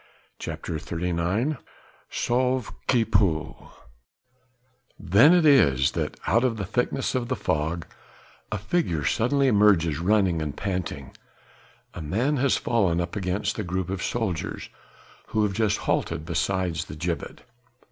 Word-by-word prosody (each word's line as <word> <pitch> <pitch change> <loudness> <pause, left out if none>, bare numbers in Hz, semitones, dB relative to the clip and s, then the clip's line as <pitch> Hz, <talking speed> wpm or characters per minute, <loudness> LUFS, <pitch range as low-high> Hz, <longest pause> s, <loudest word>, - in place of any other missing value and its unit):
CHAPTER 80 - -5
XXXIX 90 - -1 0.5
"SAUVE 125 0 0
QUI 120 -3 +3
PEUT" 85 -8 +1 1.4
Then 100 - +5
it 175 -2 +4
is 70 - +5
that, - - -3
out 115 +2 +3
of 120 -3 +1
the 100 - -3
thickness 125 +6 -1
of 125 -2 -1
the - - -1
fog 80 0 -2 0.7
a 110 - -1
figure 100 - -1
suddenly 135 +4 +2
emerges 100 - +4
running 95 -2 +2
and 75 -2 -4
panting: 95 -4 -4 0.8
a 85 - -7
man 115 - 0
has 135 +1 +2
fallen 95 -8 +1
up 85 0 -3
against 95 -1 -2
the 110 - -2
group 95 0 -3
of 95 -1 -3
soldiers 105 -9 -3 0.6
who 110 -1 0
have 105 -2 0
just 105 -1 +1
halted 80 -2 -1
beside 90 0 -1
the 75 - -5
gibbet. 85 -1 -4
95 Hz, 135 wpm, -25 LUFS, 85-120 Hz, 1.4 s, Then